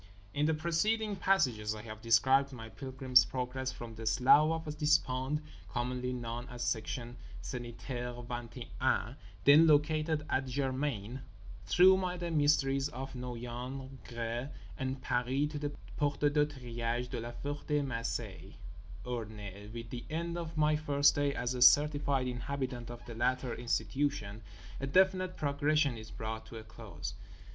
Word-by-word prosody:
In 150 Hz, +1 st, +2 dB
the 160 Hz, -, +2 dB
preceding 205 Hz, +7 st, +1 dB
pages 125 Hz, -, +2 dB
I 105 Hz, -, -8 dB
have 110 Hz, -1 st, -8 dB
described 130 Hz, +5 st, +4 dB
my 115 Hz, -3 st, -8 dB
Pilgrim's 130 Hz, 0 st, +3 dB
Progress 130 Hz, 0 st, -3 dB
from 120 Hz, -3 st, -8 dB
the 110 Hz, 0 st, -6 dB
Slough 155 Hz, +7 st, +5 dB
of 150 Hz, -1 st, -4 dB
Despond, 150 Hz, -1 st, +2 dB, 0.3 s
commonly 125 Hz, +3 st, -2 dB
known 120 Hz, 0 st, -4 dB
as 125 Hz, -1 st, -5 dB
Section 120 Hz, +1 st, -2 dB, 0.2 s
Sanitaire 120 Hz, +2 st, -5 dB
Vingt 120 Hz, 0 st, -6 dB
et 120 Hz, -, -6 dB
Un 130 Hz, -1 st, +1 dB, 0.3 s
(then 150 Hz, +3 st, +8 dB
located 155 Hz, 0 st, +3 dB
at 130 Hz, 0 st, 0 dB
Germaine) 130 Hz, -3 st, -2 dB, 0.5 s
through 190 Hz, +1 st, +6 dB, 0.2 s
the 175 Hz, -1 st, -3 dB
mysteries 145 Hz, -2 st, +3 dB
of 135 Hz, +2 st, -6 dB
Noyon, 125 Hz, +2 st, -6 dB
Gré 120 Hz, +2 st, -4 dB, 0.3 s
and 130 Hz, +4 st, -3 dB
Paris 130 Hz, +4 st, 0 dB
to 150 Hz, -, -4 dB
the 145 Hz, 0 st, -2 dB, 0.3 s
Porte 145 Hz, -1 st, 0 dB
de 150 Hz, -1 st, +4 dB
Triage 120 Hz, -3 st, -3 dB
de -, -, -2 dB
La 120 Hz, +1 st, -6 dB
Ferté 145 Hz, +2 st, -2 dB
Macé, 110 Hz, -6 st, -4 dB, 0.5 s
Orne. 105 Hz, -4 st, -6 dB
With 115 Hz, 0 st, -7 dB
the 120 Hz, -1 st, -5 dB
end 170 Hz, +2 st, -2 dB
of 165 Hz, -2 st, -5 dB
my 150 Hz, 0 st, +4 dB
first 145 Hz, -2 st, +4 dB
day 145 Hz, -1 st, 0 dB
as 120 Hz, +1 st, -1 dB
a 125 Hz, -, -4 dB
certified 145 Hz, 0 st, +5 dB
inhabitant 125 Hz, -1 st, -3 dB
of 120 Hz, 0 st, -9 dB
the 120 Hz, -, -7 dB
latter 125 Hz, +1 st, 0 dB
institution 115 Hz, -1 st, -1 dB, 0.4 s
a 135 Hz, -, -3 dB
definite 185 Hz, +3 st, +3 dB
progression 145 Hz, -1 st, +2 dB
is 110 Hz, -1 st, -9 dB
brought 110 Hz, 0 st, -5 dB
to 115 Hz, -, -9 dB
a 110 Hz, -, -8 dB
close. 110 Hz, -, -8 dB
130 Hz, 150 wpm, -33 LUFS, 120-145 Hz, 0.5 s, then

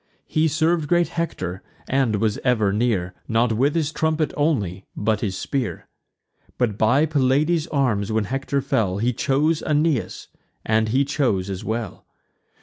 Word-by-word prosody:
He 155 Hz, +1 st, +1 dB
serv'd 160 Hz, 0 st, +1 dB
great 175 Hz, -1 st, +3 dB
Hector, 95 Hz, -, -3 dB, 0.3 s
and 130 Hz, -5 st, +1 dB
was 105 Hz, 0 st, 0 dB
ever 110 Hz, -6 st, +2 dB
near, 105 Hz, -5 st, 0 dB
Not 115 Hz, 0 st, +2 dB
with 135 Hz, +7 st, +1 dB
his 155 Hz, -3 st, 0 dB
trumpet 160 Hz, -1 st, 0 dB
only, 105 Hz, -, 0 dB
but 105 Hz, 0 st, 0 dB
his 95 Hz, -4 st, -2 dB
spear. 135 Hz, -4 st, -3 dB, 0.7 s
But 120 Hz, -5 st, 0 dB
by 120 Hz, +8 st, +3 dB
Pelides' 150 Hz, +3 st, +1 dB
arms 115 Hz, -9 st, 0 dB
when 110 Hz, 0 st, +1 dB
Hector 135 Hz, +5 st, -2 dB
fell, 105 Hz, -8 st, 0 dB
He 120 Hz, +4 st, 0 dB
chose 150 Hz, +7 st, +1 dB
Aeneas; 150 Hz, -4 st, 0 dB, 0.4 s
and 110 Hz, 0 st, +2 dB
he 135 Hz, +5 st, +2 dB
chose 115 Hz, -10 st, 0 dB
as 95 Hz, -, -5 dB
well. 110 Hz, -1 st, -4 dB
125 Hz, 145 wpm, -22 LUFS, 110-150 Hz, 0.7 s, great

